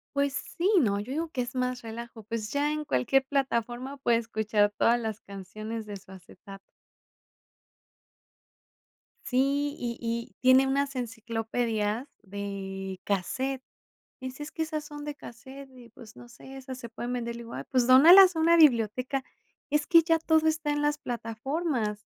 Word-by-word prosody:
Pues, 280 -1 +1 0.2
sí 370 +5 +2
y - - +7
no, 205 -8 +1
yo 215 +6 -6
digo 325 +3 -2
que 255 - -2
es 245 0 -5
más 250 -1 -1
relajo, 225 0 -8
pues, 220 0 -5
ya 290 +1 +1
en 305 0 -3
cualquier 265 - +2
plataforma 260 -1 -2
puede 240 -3 +2
escuchar 220 -2 0
todas 240 +1 +3
las 220 -1 -4
canciones 215 +3 -7
de 205 -1 -7
su 190 - -17
acetato. 195 +1 -13 2.6
Sí, 280 +3 +1
y 235 -1 -4
y 235 0 -4
tiene 260 +1 +6
unas 275 0 0
enciclopedias 225 0 -2 0.2
de 195 -1 -6
casete. 260 +7 -2 0.6
Dice, 260 +3 -7
"Es 295 - -9
que 320 - -5
esas 310 -1 -3
son 295 -1 -9
de 295 0 -5
casete, 265 +2 -12
y 235 - -15
pues 225 -1 -15
no 240 - -13
sé, 265 +3 -12
esas 260 -1 -8
se 235 -2 -9
pueden 240 +2 -5
vender", 235 -1 -3
le 235 - -8
digo, 230 - -10
ah, - - -6
pues, 250 -2 +2
dónalas 345 +8 +9
a - - -1
una 335 +1 +5
biblioteca. 255 -2 +3 0.5
Es 295 0 +1
que 335 -2 +6
ya 325 0 +2
todo 320 0 +2
está 310 -1 0
en 295 - -1
las 295 0 +1
plataformas. 235 -1 -3
250 Hz, 170 wpm, -28 LUFS, 225-285 Hz, 2.6 s, dónalas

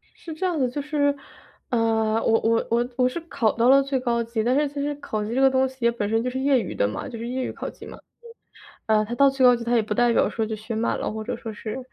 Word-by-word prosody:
是 325 - -9
这 345 - -5
样 345 -4 -1
的 255 -2 +1
就 285 +4 -4
是， 285 -1 +1 0.5
啊， 225 -1 +1
我 225 - +3
我 230 0 +1
我 240 +1 +1
我 250 -1 +3
是 295 +7 -5
考 240 -9 0
到 235 +2 +2
了 275 +1 +7
最 270 -1 -1
高 235 -2 0
级， 225 -1 -2
但 245 +3 +1
是 295 0 +2
其 285 0 -6
实 290 +1 -2
考 215 -7 -4
级 225 +3 -4
这 265 - +1
个 270 - +6
东 265 0 +2
西 260 - -14
也 235 0 +3
本 210 -3 -3
身 225 +1 +1
就 250 - -2
是 260 - -4
业 265 -2 +3
余 185 - -5
的 100 - +1
嘛 105 - -5
就 235 -3 -7
是 230 - -5
业 255 +1 -2
余 - - -3
考 - - -6
级 - - -13
嘛。 - - -10 0.9
呃， 215 -1 +3
它 235 - -5
到 275 +2 +5
最 270 -1 0
高 245 - +7
级， 235 - -7
它 240 +1 0
也 230 - +3
不 210 0 -3
代 240 +1 +3
表 - - +3
说 225 - -2
就 220 0 -4
学 220 +2 -6
满 225 +2 -1
了， - - -2
或 220 0 -5
者 245 0 -3
说 225 -1 -7
是 215 +3 -6
240 Hz, 320 characters per minute, -24 LUFS, 225-270 Hz, 0.9 s, 了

